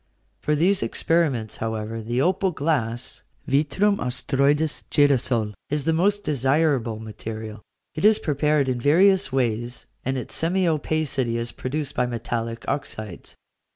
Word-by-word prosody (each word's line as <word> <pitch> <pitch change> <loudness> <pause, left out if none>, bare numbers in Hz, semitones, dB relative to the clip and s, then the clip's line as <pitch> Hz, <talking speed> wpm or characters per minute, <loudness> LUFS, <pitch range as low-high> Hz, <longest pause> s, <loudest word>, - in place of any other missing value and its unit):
For 150 - 0
these 185 +6 +3
experiments, 145 -10 0
however, 110 0 -3
the 120 +4 0
opal 190 +2 +2
glass 135 -8 -1 0.3
(vitrum 175 +9 +2
astroides, 140 +4 +1
girasole) 125 -6 +2 0.2
is 145 -1 -1
the 165 - +2
most 200 +5 +2
desirable 135 - +1
material. 110 0 -7 0.3
It 155 - -5
is 215 0 +6
prepared 150 -1 +1
in 125 -2 -1
various 185 +6 +4
ways, 120 -2 -1 0.2
and 130 +1 -1
its 125 - -5
semi 180 +3 +1
opacity 150 -6 0
is 115 0 -3
produced 140 +2 -4
by 125 0 +1
metallic 115 -1 -3
oxydes. 110 - -5
135 Hz, 130 wpm, -24 LUFS, 115-155 Hz, 0.3 s, is